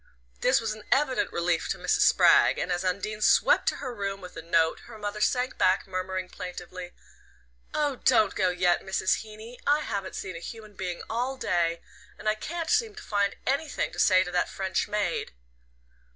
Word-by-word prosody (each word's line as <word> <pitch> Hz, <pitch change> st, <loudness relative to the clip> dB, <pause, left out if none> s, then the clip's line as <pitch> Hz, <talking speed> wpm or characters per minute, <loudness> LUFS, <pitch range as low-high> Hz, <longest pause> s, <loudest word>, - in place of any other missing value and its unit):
This 255 Hz, +1 st, +3 dB
was 225 Hz, -2 st, -2 dB
an 215 Hz, -1 st, -11 dB
evident 270 Hz, -3 st, +2 dB
relief 170 Hz, -1 st, 0 dB
to -, -, -1 dB
Mrs. -, -, +1 dB
Spragg, -, -, +5 dB
and -, -, -2 dB
as 175 Hz, +1 st, -1 dB
Undine 200 Hz, +3 st, -2 dB
swept -, -, +4 dB
to -, -, -4 dB
her 255 Hz, -3 st, -5 dB
room 200 Hz, -3 st, -3 dB
with 180 Hz, -2 st, -10 dB
the -, -, -7 dB
note 160 Hz, -1 st, +2 dB
her -, -, -10 dB
mother 210 Hz, 0 st, -4 dB
sank 250 Hz, +2 st, 0 dB
back, 185 Hz, +2 st, +3 dB
murmuring 185 Hz, 0 st, -3 dB
plaintively: 180 Hz, 0 st, -8 dB, 0.8 s
"Oh, 290 Hz, -3 st, 0 dB
don't 235 Hz, -4 st, +3 dB
go 185 Hz, -, +2 dB
yet, 180 Hz, -1 st, +2 dB
Mrs. 190 Hz, -1 st, +1 dB
Heeny. 220 Hz, +2 st, -11 dB
I 295 Hz, +1 st, +4 dB
haven't 195 Hz, -8 st, -4 dB
seen 185 Hz, -2 st, -5 dB
a -, -, -6 dB
human 215 Hz, +3 st, -9 dB
being 180 Hz, -3 st, -5 dB
all 250 Hz, +4 st, -2 dB
day, 170 Hz, -6 st, 0 dB, 0.4 s
and -, -, -7 dB
I 215 Hz, -, +4 dB
can't 330 Hz, +9 st, -4 dB
seem 445 Hz, -3 st, +2 dB
to 425 Hz, -, -9 dB
find 200 Hz, -1 st, 0 dB
anything 280 Hz, +3 st, -1 dB
to -, -, -8 dB
say 185 Hz, -2 st, +5 dB
to 180 Hz, -, -6 dB
that 180 Hz, 0 st, +1 dB
French 190 Hz, -1 st, -2 dB
maid." 205 Hz, -, -2 dB
200 Hz, 190 wpm, -27 LUFS, 185-235 Hz, 0.8 s, Spragg